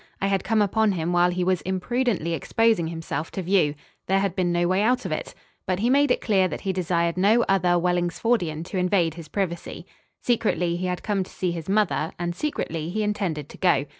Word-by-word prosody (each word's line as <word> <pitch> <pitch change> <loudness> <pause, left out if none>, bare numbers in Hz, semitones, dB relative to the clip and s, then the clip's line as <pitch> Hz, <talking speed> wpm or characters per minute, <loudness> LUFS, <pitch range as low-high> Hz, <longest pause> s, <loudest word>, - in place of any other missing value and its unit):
I - - -1
had 195 -1 +1
come 220 -2 +2
upon 215 +1 +2
him 170 0 -2
while 175 0 +4
he 180 0 -1
was 185 -1 +1
imprudently 190 -1 -1
exposing 220 +2 +1
himself 160 -2 -4
to 190 - -3
view. 170 -5 +2 0.3
There 195 - +3
had 195 -2 0
been 180 -2 +1
no 175 0 +1
way 185 +2 +2
out 250 +4 +1
of - - -3
it. - - -4 0.3
But 185 - +1
he 230 +6 +1
made 285 +1 +4
it 250 - +1
clear 195 -4 +2
that - - -6
he 195 -1 -1
desired 170 -1 0
no 215 +6 +4
other 180 -2 +3
Wellingsfordian 175 0 0
to 185 +2 -4
invade 180 -3 +2
his 165 -1 -10
privacy. 175 -1 -4 0.3
Secretly 205 -7 0
he 180 +1 -2
had 180 0 -3
come 205 -3 0
to - - -13
see 180 -2 -2
his 165 0 -6
mother 190 -7 +1
and 175 0 -2
secretly 165 - -3
he 215 +4 -1
intended 190 -9 -2
to - - -12
go. 150 -7 +3
185 Hz, 215 wpm, -24 LUFS, 170-205 Hz, 0.3 s, while